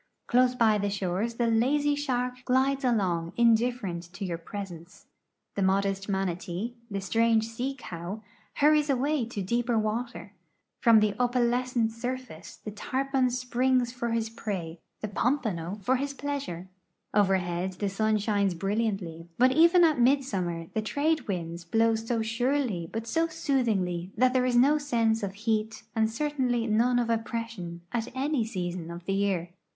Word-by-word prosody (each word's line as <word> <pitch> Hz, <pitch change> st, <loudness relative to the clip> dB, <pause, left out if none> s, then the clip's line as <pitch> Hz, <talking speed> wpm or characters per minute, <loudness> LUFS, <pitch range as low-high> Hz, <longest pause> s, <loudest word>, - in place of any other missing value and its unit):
Close 250 Hz, +1 st, +3 dB
by 220 Hz, -3 st, +3 dB
the 205 Hz, 0 st, 0 dB
shores 200 Hz, +3 st, -2 dB
the 235 Hz, -, +1 dB
lazy 270 Hz, +6 st, +2 dB
shark 250 Hz, -3 st, -2 dB
glides 270 Hz, +2 st, +2 dB
along 185 Hz, -9 st, 0 dB
indifferent 230 Hz, -6 st, +2 dB
to 195 Hz, -, -5 dB
j'our 170 Hz, -2 st, -4 dB
presence. 190 Hz, -1 st, -8 dB, 0.5 s
The 200 Hz, -, -2 dB
modest 195 Hz, +1 st, +1 dB
manatee, 190 Hz, +3 st, -2 dB, 0.2 s
the 200 Hz, -1 st, -3 dB
strange 225 Hz, +3 st, +2 dB
sea 250 Hz, +4 st, -3 dB
cow, 185 Hz, -1 st, -7 dB, 0.3 s
hurries 300 Hz, 0 st, +4 dB
away 275 Hz, 0 st, +1 dB
to 210 Hz, -4 st, -4 dB
dee})er 235 Hz, +3 st, +1 dB
water. 215 Hz, -1 st, -3 dB, 0.5 s
From 225 Hz, -2 st, +6 dB
the 210 Hz, -1 st, +2 dB
opalescent 245 Hz, -1 st, +1 dB
surface 245 Hz, -6 st, -6 dB
the 210 Hz, -, -8 dB
tarpon 265 Hz, +4 st, 0 dB
springs 250 Hz, 0 st, +1 dB
for 235 Hz, -1 st, -3 dB
his 225 Hz, -1 st, -1 dB
prey, 180 Hz, -7 st, -5 dB, 0.2 s
the 215 Hz, -, -2 dB
pompano 205 Hz, -, -1 dB
for 255 Hz, +6 st, +2 dB
his 280 Hz, +1 st, -3 dB
pleasure. 275 Hz, -12 st, -4 dB, 0.5 s
Overhead 185 Hz, -2 st, +1 dB
the 200 Hz, +2 st, -2 dB
sun 215 Hz, +2 st, +1 dB
shines 200 Hz, -3 st, +1 dB
brilliantly, 195 Hz, -4 st, -2 dB
but 255 Hz, +2 st, +5 dB
even 340 Hz, +5 st, +6 dB
at 310 Hz, -5 st, +4 dB
midsummer 200 Hz, -11 st, +1 dB
the 220 Hz, -, 0 dB
trade 290 Hz, +6 st, 0 dB
winds 170 Hz, -3 st, -4 dB
blowso 225 Hz, +4 st, +1 dB
surely 230 Hz, -, 0 dB
but 225 Hz, +1 st, -4 dB
so 325 Hz, +8 st, +1 dB
soothingly 220 Hz, -, 0 dB
that 255 Hz, 0 st, +4 dB
there 255 Hz, -1 st, +3 dB
is 245 Hz, -, +1 dB
no 280 Hz, +5 st, +5 dB
sense 230 Hz, -5 st, +1 dB
of 195 Hz, -1 st, -4 dB
heat 220 Hz, +1 st, -1 dB
and 220 Hz, -1 st, +2 dB
certainly 250 Hz, -2 st, 0 dB
none 235 Hz, +3 st, +2 dB
of 235 Hz, -1 st, +1 dB
oppression 225 Hz, -6 st, -4 dB
at 235 Hz, -2 st, -1 dB
any 275 Hz, -1 st, 0 dB
season 180 Hz, -5 st, -4 dB
of 170 Hz, 0 st, -8 dB
the 195 Hz, -, -1 dB
year. 195 Hz, -3 st, 0 dB
225 Hz, 150 wpm, -28 LUFS, 195-250 Hz, 0.5 s, From